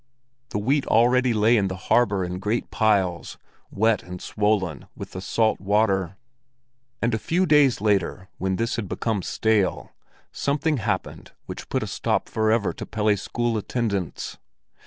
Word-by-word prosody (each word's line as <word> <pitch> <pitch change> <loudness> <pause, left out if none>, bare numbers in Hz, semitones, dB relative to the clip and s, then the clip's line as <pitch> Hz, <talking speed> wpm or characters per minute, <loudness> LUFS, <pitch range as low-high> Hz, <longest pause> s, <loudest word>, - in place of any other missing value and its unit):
The - - -3
wheat 135 +7 +1
already 125 +2 +4
lay 110 +1 +4
in 100 -2 +2
the 95 - -4
harbor 100 0 +2
in 90 +1 -5
great 105 +4 -2
piles, 95 -6 +1 0.3
wet 110 +1 +2
and 90 0 -8
swollen 105 -8 -1
with - - -8
the 95 - -6
salt 110 +3 +1
water. 95 -2 +1 0.9
And 115 0 +1
a 110 - 0
few 175 +10 +1
days 150 - +4
later, 100 -3 0
when 95 0 0
this 115 +4 -1
had 105 -5 -4
become 110 -4 -1
stale, 105 0 0 0.4
something 150 +2 0
happened 110 - -3
which - - -8
put - - 0
a - - -4
stop - - -1
forever 110 -1 +1
to - - -7
Pelle's 105 -2 +1
school 120 -2 -1
attendance. 100 -6 -3
105 Hz, 155 wpm, -24 LUFS, 95-115 Hz, 0.9 s, already